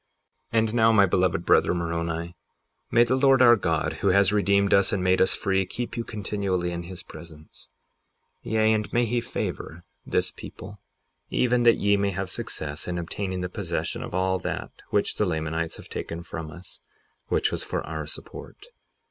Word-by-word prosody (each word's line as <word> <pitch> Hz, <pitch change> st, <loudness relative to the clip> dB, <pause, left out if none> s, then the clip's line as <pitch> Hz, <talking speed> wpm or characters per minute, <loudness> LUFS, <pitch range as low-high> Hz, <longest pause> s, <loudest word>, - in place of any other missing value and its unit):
58:41 115 Hz, -, 0 dB
And 110 Hz, 0 st, 0 dB
now, 115 Hz, -1 st, +5 dB
my 100 Hz, -3 st, +6 dB
beloved 90 Hz, -2 st, +1 dB
brother, -, -, +4 dB
Moroni, 85 Hz, 0 st, -3 dB, 0.5 s
may 120 Hz, -, +5 dB
the 120 Hz, +2 st, +1 dB
Lord 135 Hz, -1 st, +5 dB
our 120 Hz, -2 st, +8 dB
God, 85 Hz, -7 st, 0 dB
who -, -, +1 dB
has 100 Hz, +1 st, +4 dB
redeemed 100 Hz, -1 st, +3 dB
us 100 Hz, +2 st, +4 dB
and 100 Hz, -4 st, 0 dB
made 95 Hz, 0 st, +3 dB
us 95 Hz, -, +3 dB
free, 95 Hz, -2 st, +1 dB
keep 120 Hz, +6 st, -5 dB
you 115 Hz, -, -2 dB
continually 100 Hz, -5 st, -2 dB
in 85 Hz, 0 st, -4 dB
his 85 Hz, +1 st, -9 dB
presence; 80 Hz, -2 st, -13 dB, 0.7 s
yea, 110 Hz, 0 st, +2 dB
and 105 Hz, -1 st, -1 dB
may 120 Hz, 0 st, +2 dB
he 120 Hz, +1 st, 0 dB
favor 85 Hz, -7 st, -5 dB, 0.2 s
this -, -, -1 dB
people, 100 Hz, +2 st, -10 dB, 0.5 s
even 125 Hz, -1 st, +2 dB
that 120 Hz, -1 st, +5 dB
ye 100 Hz, 0 st, +3 dB
may 100 Hz, 0 st, +1 dB
have 95 Hz, -1 st, -3 dB
success 75 Hz, -2 st, -5 dB
in 90 Hz, -1 st, -2 dB
obtaining 95 Hz, +2 st, -3 dB
the 90 Hz, -, -2 dB
possession 90 Hz, -, -3 dB
of -, -, -6 dB
all 95 Hz, 0 st, +1 dB
that -, -, -4 dB, 0.2 s
which 105 Hz, -, 0 dB
the 105 Hz, -, +2 dB
Lamanites 80 Hz, 0 st, -2 dB
have -, -, -12 dB
taken 85 Hz, +1 st, -5 dB
from 80 Hz, -2 st, -6 dB
us, 90 Hz, +4 st, -11 dB, 0.5 s
which -, -, +1 dB
was -, -, -2 dB
for -, -, -3 dB
our 80 Hz, -1 st, -5 dB
support. -, -, -9 dB
95 Hz, 180 wpm, -26 LUFS, 85-110 Hz, 0.7 s, our